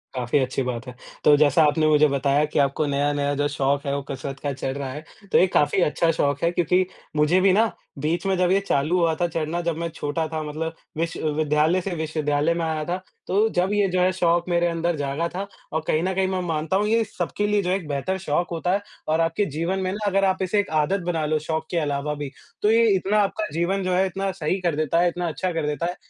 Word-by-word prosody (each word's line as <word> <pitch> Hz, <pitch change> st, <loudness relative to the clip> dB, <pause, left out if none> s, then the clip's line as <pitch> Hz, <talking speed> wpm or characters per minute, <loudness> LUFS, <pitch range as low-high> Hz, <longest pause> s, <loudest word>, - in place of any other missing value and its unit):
काफ़ी 125 Hz, +2 st, 0 dB
अच्छी 130 Hz, 0 st, -1 dB
बात 125 Hz, -1 st, -4 dB
है, 125 Hz, -, -8 dB, 0.3 s
तो 150 Hz, -, +7 dB
जैसा 150 Hz, +2 st, +4 dB
आपने 155 Hz, +1 st, +2 dB
मुझे 150 Hz, 0 st, +5 dB
बताया 140 Hz, +1 st, +2 dB
कि 150 Hz, -, -1 dB
आपको 140 Hz, +2 st, +1 dB
नया-नया 145 Hz, 0 st, 0 dB
जो 145 Hz, +1 st, +1 dB
शौक 140 Hz, -1 st, 0 dB
है 140 Hz, 0 st, -1 dB
वो 140 Hz, -, -2 dB
कसरत 135 Hz, 0 st, -6 dB
का 145 Hz, -1 st, -1 dB
चढ़ 135 Hz, +1 st, -4 dB
रहा 135 Hz, -2 st, -4 dB
है। 150 Hz, +3 st, -7 dB, 0.3 s
तो -, -, +5 dB
ये 185 Hz, -, +5 dB
काफ़ी 145 Hz, +5 st, +3 dB
अच्छा 165 Hz, +1 st, +2 dB
शौक 145 Hz, -3 st, 0 dB
है 170 Hz, -, +3 dB
क्योंकि 180 Hz, +2 st, +2 dB, 0.3 s
मुझे 155 Hz, +5 st, +3 dB
भी 195 Hz, 0 st, +5 dB
ना 220 Hz, +1 st, +3 dB, 0.3 s
बीच 165 Hz, +5 st, -1 dB
में 195 Hz, -1 st, +2 dB
जब 180 Hz, 0 st, +2 dB
ये 195 Hz, -, +4 dB
चालू 150 Hz, +6 st, +1 dB
हुआ 165 Hz, -2 st, +3 dB
था 175 Hz, -, +3 dB
चढ़ना, 165 Hz, +1 st, -2 dB
जब 170 Hz, -2 st, -2 dB
मैं 170 Hz, 0 st, -2 dB
छोटा 160 Hz, 0 st, -3 dB
था 155 Hz, 0 st, -4 dB
मतलब 160 Hz, +2 st, -4 dB, 0.2 s
विश्व 165 Hz, -1 st, -2 dB
विद्यालय 155 Hz, +4 st, +2 dB
से 195 Hz, -, -4 dB
विश्वविद्यालय 155 Hz, -1 st, 0 dB
में 170 Hz, -1 st, -2 dB
आया 160 Hz, -1 st, -2 dB
था, 175 Hz, +2 st, -1 dB, 0.3 s
तो 210 Hz, +4 st, +2 dB
जब 185 Hz, +3 st, +1 dB
ये 205 Hz, -1 st, +3 dB
जो 180 Hz, -, +2 dB
है 185 Hz, +1 st, +4 dB
शौक 175 Hz, -1 st, +1 dB
मेरे 175 Hz, 0 st, +2 dB
अंदर 170 Hz, 0 st, -1 dB
जागा 145 Hz, +3 st, -1 dB
था 195 Hz, +3 st, -5 dB, 0.3 s
और 160 Hz, -, 0 dB
कहीं 155 Hz, +2 st, +1 dB
न 190 Hz, +1 st, 0 dB
कहीं 190 Hz, 0 st, +1 dB
मैं 185 Hz, -1 st, -1 dB
मानता 165 Hz, 0 st, -1 dB
हूँ 205 Hz, +1 st, +1 dB
ये 225 Hz, +1 st, +3 dB
सबके 205 Hz, +1 st, -3 dB
लिए 205 Hz, 0 st, +2 dB
जो 180 Hz, -, -2 dB
है 185 Hz, -, +2 dB
एक 185 Hz, -5 st, -5 dB
बेहतर 145 Hz, +7 st, -2 dB
शौक 165 Hz, +4 st, +1 dB
होता 170 Hz, +1 st, -1 dB
है 200 Hz, -, +1 dB, 0.3 s
और 160 Hz, +1 st, +2 dB
आपके 165 Hz, +5 st, +1 dB
जीवन 175 Hz, +4 st, -1 dB
में 185 Hz, -1 st, -1 dB
ना 210 Hz, +2 st, -4 dB
अगर 195 Hz, 0 st, +2 dB
आप 190 Hz, 0 st, +1 dB
इसे 190 Hz, +3 st, +1 dB
एक 205 Hz, -, -1 dB
आदत 190 Hz, +7 st, 0 dB
बना 165 Hz, -3 st, -1 dB
लो, 155 Hz, +1 st, +1 dB
शौक 160 Hz, +1 st, -3 dB
के 175 Hz, -, 0 dB
अलावा 145 Hz, -1 st, -1 dB
भी, 145 Hz, -2 st, -5 dB, 0.3 s
तो 210 Hz, -, +3 dB
ये 230 Hz, +1 st, +5 dB
इतना 200 Hz, +3 st, +1 dB
आपका 205 Hz, +1 st, -1 dB
जीवन 180 Hz, +4 st, 0 dB
जो 185 Hz, 0 st, 0 dB
है 185 Hz, +1 st, +3 dB
इतना 195 Hz, +1 st, -2 dB
सही 185 Hz, +1 st, -2 dB
कर 170 Hz, -4 st, 0 dB
देता 155 Hz, +2 st, +1 dB
है, 175 Hz, -, +4 dB
इतना 175 Hz, 0 st, -3 dB
अच्छा 180 Hz, +3 st, -2 dB
कर 165 Hz, -2 st, -1 dB
देता 150 Hz, +2 st, -2 dB
है 175 Hz, +1 st, -2 dB
165 Hz, 255 wpm, -24 LUFS, 150-185 Hz, 0.3 s, तो